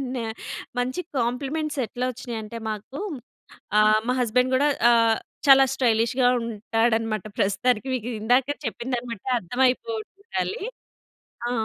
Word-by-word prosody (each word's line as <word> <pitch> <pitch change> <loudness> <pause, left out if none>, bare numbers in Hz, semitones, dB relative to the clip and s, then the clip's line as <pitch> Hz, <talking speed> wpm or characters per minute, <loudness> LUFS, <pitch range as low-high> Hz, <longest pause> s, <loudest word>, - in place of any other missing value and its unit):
న - - -2 0.6
మంచి 255 +8 -1 0.2
కాంప్లిమెంట్స్ 275 +5 -1
ఎట్లా 250 +1 -3
వచ్చినాయి 240 -2 -6
అంటే 230 +2 -7
మాకు. 215 - -6 0.8
ఆహ్, 215 0 +5
మా 250 - +2
హస్బెండ్ 250 +2 +2
కూడా 285 +3 +3 0.2
ఆహ్, 230 -1 +4 0.3
చాలా 270 0 +8
స్టైలిష్‌గా 235 +1 +2
ఉంటాడన్నమాట. 225 -1 0 0.2
ప్రస్తుతానికి 215 +5 +1
మీకు 240 0 -4
ఇందాకే 255 +5 +2
చెప్పిందాన్ని 240 +1 -3
బట్టి 230 +5 -7
అర్థమైపోతుండాలి. 260 - -1 0.9
ఆ! - - -2
245 Hz, 115 wpm, -25 LUFS, 225-260 Hz, 0.9 s, చాలా